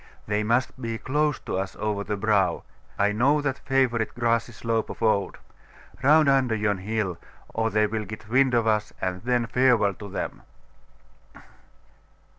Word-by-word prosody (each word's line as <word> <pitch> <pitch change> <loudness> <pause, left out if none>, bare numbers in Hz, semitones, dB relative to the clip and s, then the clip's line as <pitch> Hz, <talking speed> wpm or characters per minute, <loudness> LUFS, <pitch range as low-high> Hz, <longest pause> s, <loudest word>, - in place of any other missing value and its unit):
They 105 +1 0
must 120 +4 0
be 115 -2 -3
close 150 +3 0
to - - -3
us 95 0 -4
over 105 -1 -2
the 105 0 -3
brow. 100 -4 +1 0.3
I 100 0 +2
know 130 +8 +3
that 140 -2 -2
favourite 130 -4 0
grassy 115 0 0
slope 115 -1 -2
of - - -7
old. 100 -3 +1 0.6
Round 150 +3 +5
under 135 -4 +3
yon 105 -2 0
hill, 100 -3 -2 0.3
or 115 0 0
they 105 -1 +2
will 105 0 -3
get 110 +1 -9
wind 130 +2 +3
of 115 -1 +2
us, 110 -1 0
and 90 -1 -3
then 120 0 +1
farewell 120 -5 +3
to 100 +1 -10
them! 95 - -5
110 Hz, 160 wpm, -25 LUFS, 105-125 Hz, 0.6 s, Round